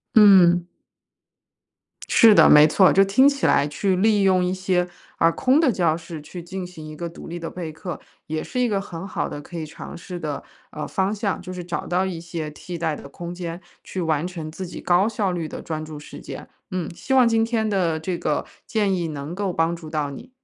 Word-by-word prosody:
嗯。 185 -5 +7 1.4
是 225 -2 +7
的， - - +7
没 150 +1 +8
错， 185 +4 +5
就 195 - +6
听 200 +8 +5
起 280 -1 -2
来 145 - +4
去 185 +6 0
利 205 +2 +3
用 185 -1 +4
一 180 - 0
些， 185 -1 0 0.3
啊， 165 - +4
空 265 - +3
的 295 -7 +4
教 170 -5 +2
室 165 -2 -8
去 175 +4 -9
进 185 +1 -5
行 175 -3 -10
一 155 - -8
个 170 +2 -4
独 170 - -11
立 175 +1 -6
的 165 - -5
备 170 -3 -6
课， 170 +2 -7 0.3
也 155 0 -3
是 250 - -4
一 250 - +3
个 200 -3 0
很 185 0 -7
好 - - -2
的 145 - -6
可 170 +3 -9
以 160 - -4
尝 155 - -9
试 175 0 -7
的， 150 -3 -4 0.3
呃， 150 - -5
方 190 +1 0
向， 205 -2 -2
就 185 0 -7
是 180 -1 -6
找 175 0 -4
到 185 +2 +1
一 175 -3 -4
些 165 -2 -5
替 170 +3 -8
代 160 -2 -1
的 140 - -10
空 170 +5 -7
间 175 -1 -6 0.2
去 185 - -5
完 160 -1 0
成 165 -4 -6
自 185 +4 -6
己 - - -8
高 180 +4 +3
效 210 -4 -1
率 170 -3 -3
的 - - -7
专 155 -1 -4
注 155 -1 -8
时 - - -11
间。 - - -8 0.2
嗯， 185 -3 -2
希 265 - -3
望 255 -2 +6
今 225 -1 +3
天 225 -2 0
的 170 -5 +1
这 175 +2 -3
个 150 - -1 0.2
建 210 -4 +1
议 170 -2 -2
能 150 +3 -6
够 195 -2 -2
帮 165 +1 +1
助 165 -2 -10
到 150 -2 -1
你。 140 - -10
175 Hz, 245 characters per minute, -23 LUFS, 160-195 Hz, 1.4 s, 没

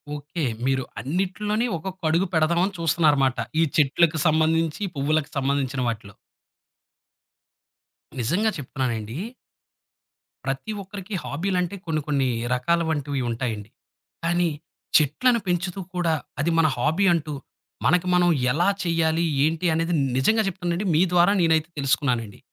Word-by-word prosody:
Okay. 150 +3 -5 0.2
మీరు 130 -1 +1 0.2
అన్నిటిలోని 195 - -1
ఒకొక్క 185 +3 -7
అడుగు 170 +4 +2
పెడదామని 170 +5 +2
చూస్తున్నారమాట. 150 -5 +3 0.3
ఈ - - +5
చెట్లకు 160 +2 +3
సంబంధించి 160 +2 +2
పువ్వులకు 150 +2 0
సంబంధించిన 135 -1 0
వాటిలో. 110 -3 -6 2.1
నిజంగా 180 - +1
చెప్తున్నానండి 120 -4 -3 1.3
ప్రతి 135 +10 -3
ఒక్కరికి 195 +1 -9
హాబీలంటే 180 +4 -1
కొన్ని 155 -2 -1
కొన్ని 140 -3 +1 0.3
రకాల 170 +7 +1
వంటివి 145 -3 -2
ఉంటాయండి. 115 -3 -4 0.6
కానీ. 175 0 +2 0.5
చెట్లను 200 - +2
పెంచుతూ 180 +1 -1 0.2
కూడా 170 -2 +1 0.3
అది 155 +4 +1
మన 165 -1 +5
హాబీ 160 +10 +1
అంటూ. 155 -3 -2 0.5
మనకి 180 +4 +3
మనం 175 0 +4 0.2
ఎలా 170 +7 +2 0.2
చేయాలి? 165 -1 +1 0.2
ఏంటి? 160 +2 -1
అనేది 165 +2 0 0.2
నిజంగా 220 +12 +3
చెప్తానండి. 180 +1 -2
మీ 160 - +4
ద్వారా 175 +2 +5
నేనైతే 160 -1 +2
తెలుసుకున్నానండి. 125 -6 0
160 Hz, 115 wpm, -24 LUFS, 140-175 Hz, 2.1 s, ఈ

